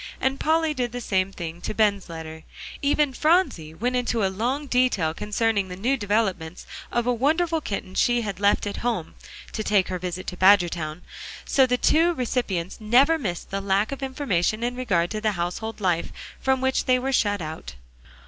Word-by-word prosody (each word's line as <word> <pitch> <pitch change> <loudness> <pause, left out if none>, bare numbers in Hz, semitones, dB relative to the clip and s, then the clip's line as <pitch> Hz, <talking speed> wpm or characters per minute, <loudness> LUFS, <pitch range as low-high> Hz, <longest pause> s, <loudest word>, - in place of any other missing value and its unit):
And 265 +1 0
Polly 320 0 +2
did 245 -4 -2
the 245 - -3
same 190 -4 0
thing 170 -2 -7
to 210 - -4
Ben's 205 -4 +1
letter. 160 -1 -8 0.4
Even 285 -1 +2
Phronsie 305 - +1
went 245 +7 -1
into 240 -4 0
a 190 - -1
long 250 +9 -1
detail 245 - +1
concerning 210 +1 0
the 180 - -7
new 240 +9 +1
developments 195 -7 -1 0.3
of 240 -1 0
a 245 - +2
wonderful 320 +6 +1
kitten 200 -6 -5
she 240 +4 +2
had 200 -4 -4
left 200 +1 +2
at 205 - -4
home, 225 -9 -2 0.4
to 215 - -3
take 205 -3 +2
her 185 -1 -3
visit 180 +1 -5
to 180 - -5
Badgertown, 175 -4 +3 0.4
so 265 -2 +4
the 250 0 +1
two 335 +6 +3
recipients 220 - -2
never 265 +9 +4
missed 180 - -4
the 195 0 -2
lack 200 +3 +1
of 275 - -5
information 235 - -1
in 245 +1 -1
regard 180 -9 0
to 215 -1 -3
the 215 -1 +1
household 180 +6 -4
life, 180 -4 0 0.3
from 265 -1 +1
which 265 0 +1
they 255 0 +4
were 265 +2 -2
shut 205 -5 +2
out. 155 - -7
215 Hz, 185 wpm, -24 LUFS, 185-255 Hz, 0.4 s, so